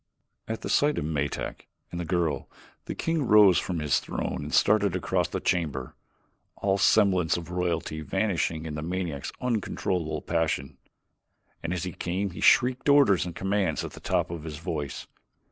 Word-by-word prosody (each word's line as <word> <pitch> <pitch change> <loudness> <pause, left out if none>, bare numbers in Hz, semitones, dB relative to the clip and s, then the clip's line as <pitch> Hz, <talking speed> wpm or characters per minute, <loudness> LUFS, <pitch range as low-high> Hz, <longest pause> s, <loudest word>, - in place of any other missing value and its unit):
At 110 0 -4
sight 145 +1 +2
of - - -1
Metak 75 -2 -3 0.2
and 85 - -5
the 85 - -3
girl, 85 -2 -1 0.4
the - - -5
king 165 -1 -1
rose 105 -4 +7
from 90 - -3
his 75 -2 +1
throne - - -4
and 75 +1 -6
started 100 -1 +3
across 90 - 0
the - - -3
chamber, 75 -7 -1 0.6
all 100 0 0
semblance 95 -7 +4
of 85 0 -7
royalty 85 -3 -2
vanishing 85 -3 -1
in 80 - -5
the 75 - -4
maniac's 85 -4 -3
uncontrollable 95 -8 -2
passion. 80 -5 -1 0.8
And 85 - -3
as 90 -1 -2
he 90 - -3
came 95 +4 -2
he 85 - -8
shrieked 130 +2 +4
orders 135 -12 +5
and 85 - -7
commands 95 -4 0
at - - -7
the - - -11
top 90 -2 0
of 85 -2 -5
his 80 -2 -6
voice. 75 -3 -4
90 Hz, 165 wpm, -27 LUFS, 80-100 Hz, 0.8 s, rose